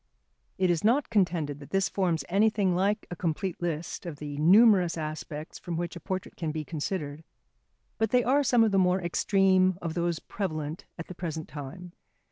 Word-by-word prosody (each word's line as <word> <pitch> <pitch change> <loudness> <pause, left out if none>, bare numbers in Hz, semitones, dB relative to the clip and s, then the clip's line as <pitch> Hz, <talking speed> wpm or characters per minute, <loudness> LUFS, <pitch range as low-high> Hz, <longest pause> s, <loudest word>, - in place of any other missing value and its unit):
It 185 -1 +3
is 165 -2 0
not 245 +4 +2
contended 170 -8 +1
that 140 - -12
this 195 0 +1
forms 180 -5 0
anything 200 0 +2
like 200 +4 +1
a - - -3
complete 175 +1 -2
list 170 0 -3
of 165 - -5
the 145 0 -6
numerous 185 +1 +5
aspects 155 0 -6
from 170 -2 -4
which 175 0 -3
a - - -6
portrait 185 +3 -5
can 160 -3 -3
be 155 0 -4
considered, 150 -1 -4 0.8
but 220 -1 +2
they 245 +2 +3
are 270 +5 +3
some 245 -4 +4
of 220 - +2
the 195 - +3
more 180 0 +3
extreme 185 +1 +2
of 165 -3 -4
those 170 -1 0
prevalent 155 -4 -4
at 165 - -6
the - - -9
present 160 -3 -5
time. 150 +5 -8
175 Hz, 185 wpm, -28 LUFS, 160-195 Hz, 0.8 s, numerous